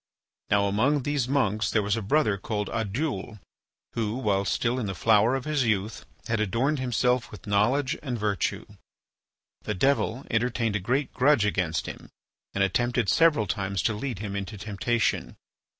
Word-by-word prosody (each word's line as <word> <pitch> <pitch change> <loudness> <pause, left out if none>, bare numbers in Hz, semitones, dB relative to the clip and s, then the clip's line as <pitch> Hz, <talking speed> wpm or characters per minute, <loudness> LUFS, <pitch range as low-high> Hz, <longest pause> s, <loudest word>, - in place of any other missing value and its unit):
Now 100 0 +3
among 125 +8 +2
these 145 -3 0
monks 105 -7 +1
there 110 - +1
was 100 0 +1
a 115 - -2
brother 110 +1 +2
called 105 +1 -3
Oddoul, 115 0 -3 0.6
who, 110 -1 -1
while 100 -6 0
still 120 +7 0
in 110 - -2
the 95 - -4
flower 110 +6 +4
of 135 - -4
his 150 -3 +1
youth, 110 -1 -1 0.2
had 115 -2 -1
adorned 120 +8 0
himself 125 0 +1
with 105 - -12
knowledge 120 +7 +2
and 130 -5 -3
virtue. 105 -3 -1 1.0
The 105 - -3
devil 135 +1 +1
entertained 115 -1 0
a - - +1
great 130 +9 -1
grudge 130 -3 +4
against 90 -6 0
him, - - -8 0.5
and 100 - +2
attempted 120 +3 +1
several 160 -9 +4
times 100 -3 -2
to 110 - +2
lead 120 +2 -4
him 100 0 -5
into 100 +2 -5
temptation. 110 +4 -1
110 Hz, 165 wpm, -26 LUFS, 100-130 Hz, 1.0 s, flower